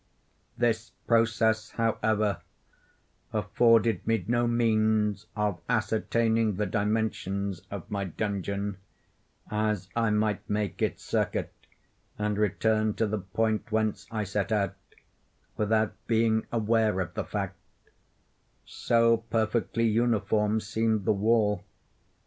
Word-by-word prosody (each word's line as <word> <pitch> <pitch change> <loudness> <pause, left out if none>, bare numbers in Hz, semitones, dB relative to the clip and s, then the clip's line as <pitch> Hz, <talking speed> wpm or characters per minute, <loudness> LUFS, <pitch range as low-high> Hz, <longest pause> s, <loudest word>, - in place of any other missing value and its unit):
This 115 0 0
process, 110 -1 +2
however, 110 -2 0 0.9
afforded 110 -1 +3
me 115 -6 +1
no 120 0 +2
means 110 -3 +1
of 105 -5 -1
ascertaining 110 -1 +1
the 105 +2 0
dimensions 100 -2 -1
of 100 -4 -7
my 100 -1 -1
dungeon; 100 +1 -3 0.7
as 105 -4 -1
I 115 -1 +2
might 105 -1 0
make 105 -2 -2
its - - -1
circuit, - - -1 0.6
and 105 0 -1
return 110 +1 +1
to 115 - +1
the 105 0 -2
point 110 +4 -1
whence 110 -1 0
I 110 -2 -2
set 100 +2 -2
out, 105 -2 +1 0.8
without 110 0 +1
being 110 -1 +2
aware 110 -3 +2
of 90 -1 -3
the - - -2
fact; 100 -2 -4 1.1
so 115 0 +2
perfectly 115 +1 0
uniform 110 -1 +1
seemed 110 -1 0
the 110 - +3
wall. 105 0 +2
110 Hz, 110 wpm, -28 LUFS, 105-115 Hz, 1.1 s, afforded